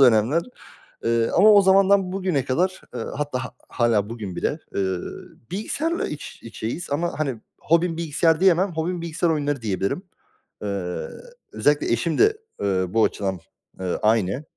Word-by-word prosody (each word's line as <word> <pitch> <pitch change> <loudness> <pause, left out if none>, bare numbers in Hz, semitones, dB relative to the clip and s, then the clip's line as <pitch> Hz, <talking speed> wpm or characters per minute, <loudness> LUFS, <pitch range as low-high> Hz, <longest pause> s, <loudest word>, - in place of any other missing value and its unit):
dönemler. 125 +5 +5 0.6
Eee, 115 0 +2
ama 215 +3 +8
o 205 - +8
zamandan 195 0 +4
bugüne 185 -8 0
kadar, 185 +8 0
eee, - - -3 0.2
hatta 140 -4 -2
ha - - -8 0.2
hâlâ 115 -3 +1
bugün 105 -6 -6
bile, 150 - -1 0.2
eee, 95 -2 0 0.5
bilgisayarla 300 - -1
iç 150 - -7
içeyiz. 115 +7 -5
Ama, 170 +2 -1
hani, 135 -7 -2 0.2
hobim 170 +1 +2
bilgisayar 165 0 +2
diyemem. 185 0 +4
Hobim 170 +2 -2
bilgisayar 170 +1 -1
oyunları 145 -3 0
diyebilirim. 100 - -1 0.6
Eee, 95 -3 -3 0.5
özellikle 145 -4 +2
eşim 150 +7 0
de, 430 0 +4 0.2
eee, 95 -2 +1
bu 110 +4 +3
açıdan, 95 -2 -2 0.4
eee, 90 -1 -2
aynı. 110 +4 +2
145 Hz, 145 wpm, -23 LUFS, 110-175 Hz, 0.6 s, ama